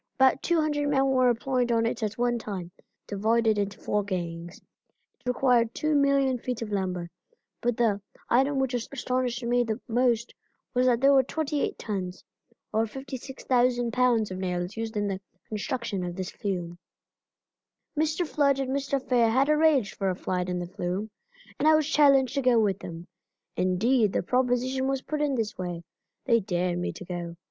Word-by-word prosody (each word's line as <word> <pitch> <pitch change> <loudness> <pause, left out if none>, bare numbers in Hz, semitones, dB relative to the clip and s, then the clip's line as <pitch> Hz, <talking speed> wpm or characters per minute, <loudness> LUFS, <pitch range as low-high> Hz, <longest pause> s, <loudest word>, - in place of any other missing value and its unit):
About 265 0 +4
200 305 -4 +1
men 270 -1 +3
were 255 -1 +4
employed 245 +1 0
on 230 -1 +2
it 230 0 -2
at 215 0 -2
one 240 0 +1
time, 190 -5 -6
being - - -29 0.3
divided 220 -1 +3
into 200 0 -2
four 210 0 -1
gangs. 175 -3 -4 0.6
It - - -14
required 245 -2 +2
2,000,000 280 -4 +2
feet 245 -2 -3
of 215 - -7
lumber, 185 -3 -2 0.5
but 240 -1 0
the 215 -4 +2 0.3
item 270 +4 +3
which 265 -1 0
astonished 250 0 -2
me 245 +1 +2 0.2
most 240 0 +1 0.4
was 250 0 +3
that 240 -1 +3
there 275 +1 +6
were 270 - +7
28 295 +2 -2
tons, 190 -4 -4 0.5
or 225 +1 +2
56,000 250 -1 -1
pounds 240 -5 +2
of 185 - -5
nails 180 0 -2
used 225 -1 -4
in 205 0 0
the 195 -1 -3 0.3
construction 215 -2 -3
of 175 -1 -4
this 185 0 -4
flume. 175 -4 -4 1.2
Mr. 310 +3 +1
Flood 285 -3 +2
and 270 -1 -2
Mr. 275 0 0
Fair 245 -3 +2
had 265 +5 +2
arranged 300 -8 +3
for 195 -1 -1
a 185 - -1
ride 180 0 -1
in 180 - -1
the 175 - -3
flume, 185 +3 -4 0.5
and 300 - +2
I 315 - +7
was 310 -2 +2
challenged 275 -5 +4
to 275 - 0
go 250 -3 +4
with 200 -3 +1
them. 170 0 -8 0.5
Indeed 210 +4 +2
the - - 0
proposition 255 +3 +1
was 270 -1 -1
put 300 -1 -3
in 290 -2 +1
this 220 -4 -3
way 175 -2 -4 0.4
they 230 -3 +4
dared 180 -2 -1
me 175 - -2
to 185 - -10
go. 175 -1 -5
235 Hz, 175 wpm, -27 LUFS, 195-265 Hz, 1.2 s, were